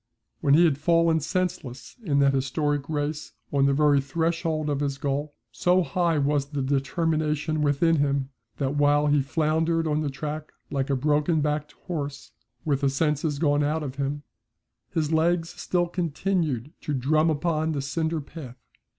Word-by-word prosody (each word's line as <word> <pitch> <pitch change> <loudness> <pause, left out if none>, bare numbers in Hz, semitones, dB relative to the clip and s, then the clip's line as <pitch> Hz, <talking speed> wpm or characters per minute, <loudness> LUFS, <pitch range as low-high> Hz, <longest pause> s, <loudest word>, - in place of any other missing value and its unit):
When 140 0 +4
he 170 +3 +6
had 145 -4 +1
fallen 165 +1 +3
senseless 155 -6 -3
in 145 -8 +1
that 140 0 +4
historic 140 +2 -1
race 150 0 -3 0.2
on 140 -1 +4
the 140 - +3
very 145 -1 +4
threshold 160 +2 -1
of 145 -2 0
his 140 -1 -1
goal, 145 +1 -2 0.2
so 180 +10 +2
high 170 +2 +1
was 145 -1 +1
the 140 -2 -3
determination 155 +2 0
within 150 +3 +3
him, 140 -2 0 0.3
that 135 -1 -1
while 145 0 +3
he 145 -1 +3
floundered 160 +3 0
on 155 -1 0
the 150 - -1
track 150 +2 -5 0.2
like 135 -1 -1
a 140 - +2
broken 150 +4 +2
backed 150 0 -1
horse, 145 -5 -5 0.3
with 140 -3 +1
the 140 - +3
senses 150 +1 0
gone 145 -1 +2
out 155 +2 0
of 135 -2 -6
him, 145 +1 -2 0.7
his 155 -2 -1
legs 165 +1 +2
still 175 0 -1
continued 165 -5 -1
to 150 - -2
drum 155 +5 +2
upon 160 0 0
the 140 - -2
cinder 160 +3 -1
path. 135 -4 -10
150 Hz, 165 wpm, -26 LUFS, 140-160 Hz, 0.7 s, he